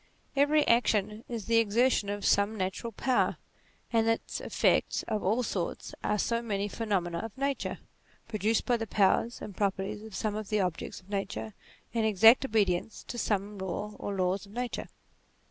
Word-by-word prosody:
Every 290 +2 +4
action 215 -2 +2
is 230 -4 -4
the 230 0 +3
exertion 230 0 +2
of 205 0 -3
some 205 +2 +3
natural 190 +4 -3
power, 255 +4 +1 0.6
and 225 -1 +3
its 225 0 -1
effects - - +1
of 215 - -2
all 220 +7 +2
sorts 185 -6 -3
are 210 - +1
so 230 +3 0
many 205 -3 -1
phenomena 190 -6 -1
of 225 +1 -7
nature, 275 0 -1 0.5
produced 220 0 0
by 245 -2 +2
the 225 -1 -4
powers 210 +4 +2
and 205 - -7
properties 200 +1 -1
of 220 -2 -9
some 215 -2 -1
of 215 -1 -5
the 215 - +1
objects 180 -2 -2
of 185 - -23
nature, 110 - -3 0.4
in 230 -1 +1
exact 220 +4 +6
obedience 210 -5 0
to 240 - -4
some 205 -1 -1
law 190 +3 -4
or 200 - -3
laws 190 +2 0
of 200 - -15
nature. 245 +1 -3
210 Hz, 170 wpm, -30 LUFS, 195-230 Hz, 0.6 s, exact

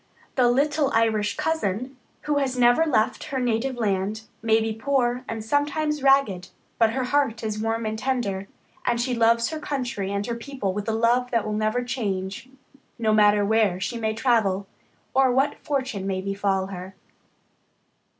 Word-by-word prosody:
The 250 -2 +3
little 285 +3 +2
Irish 220 -2 +1
cousin, 260 -5 -1 0.3
who 295 -1 0
has 260 -2 -1
never 245 +6 +4
left 220 -3 +1
her 275 -3 -3
native 250 +1 0
land, 210 0 -1 0.2
may 225 0 +3
be 220 0 -1
poor, 250 +1 0
and 225 -1 -4
sometimes 295 +3 0
ragged, 270 -10 +3 0.3
but 225 -1 +4
her 260 +1 -1
heart 250 -4 0
is 215 -1 -2
warm 225 +1 -1
and 215 0 -3
tender, 220 -7 -2 0.4
and 235 -1 0
she 250 +1 0
loves 230 0 +3
her 315 - -4
country 245 -10 -3
and 200 0 -2
her 235 - -2
people 235 -5 -4
with 205 +2 -3
a - - +2
love 235 +3 +2
that 230 -3 0
will 215 - -2
never 215 +3 0
change, 205 -3 -3 0.5
no 220 -2 +1
matter 210 -1 +4
where 210 -4 +2
she 215 +5 -3
may 220 -1 -1
travel 215 -5 +1 0.5
or 265 -1 +4
what 270 +3 +1
fortune 260 -9 -2
may 190 -1 -1
befall 195 0 -1
her. 190 0 -8
230 Hz, 170 wpm, -24 LUFS, 210-260 Hz, 0.5 s, never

